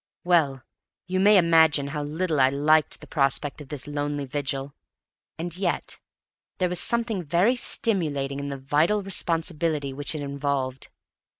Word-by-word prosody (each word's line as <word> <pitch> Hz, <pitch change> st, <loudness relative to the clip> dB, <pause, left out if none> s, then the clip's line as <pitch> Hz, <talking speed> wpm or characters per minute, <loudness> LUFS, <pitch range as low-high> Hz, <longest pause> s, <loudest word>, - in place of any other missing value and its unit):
Well, 150 Hz, -7 st, +2 dB, 0.4 s
you 185 Hz, 0 st, -2 dB
may 205 Hz, +2 st, +6 dB
imagine 160 Hz, -5 st, +4 dB
how 150 Hz, +1 st, -4 dB
little 155 Hz, +1 st, -2 dB
I 130 Hz, 0 st, +5 dB
liked 150 Hz, +3 st, +2 dB
the -, -, -10 dB
prospect 140 Hz, 0 st, -1 dB
of 145 Hz, -, -11 dB
this 145 Hz, -4 st, -3 dB
lonely 145 Hz, -1 st, -3 dB
vigil; 135 Hz, 0 st, -3 dB, 0.6 s
and 170 Hz, 0 st, -4 dB
yet 180 Hz, -2 st, -2 dB, 0.6 s
there 180 Hz, -1 st, 0 dB
was 180 Hz, 0 st, +2 dB
something 235 Hz, -4 st, +2 dB
very 175 Hz, -, +2 dB
stimulating 150 Hz, -, -1 dB
in 140 Hz, 0 st, -5 dB
the 140 Hz, -, -5 dB
vital 155 Hz, +10 st, +1 dB
responsibility 165 Hz, -5 st, -1 dB
which 145 Hz, +3 st, -2 dB
it 150 Hz, -, -4 dB
involved. 140 Hz, -2 st, -3 dB
150 Hz, 145 wpm, -25 LUFS, 140-175 Hz, 0.6 s, may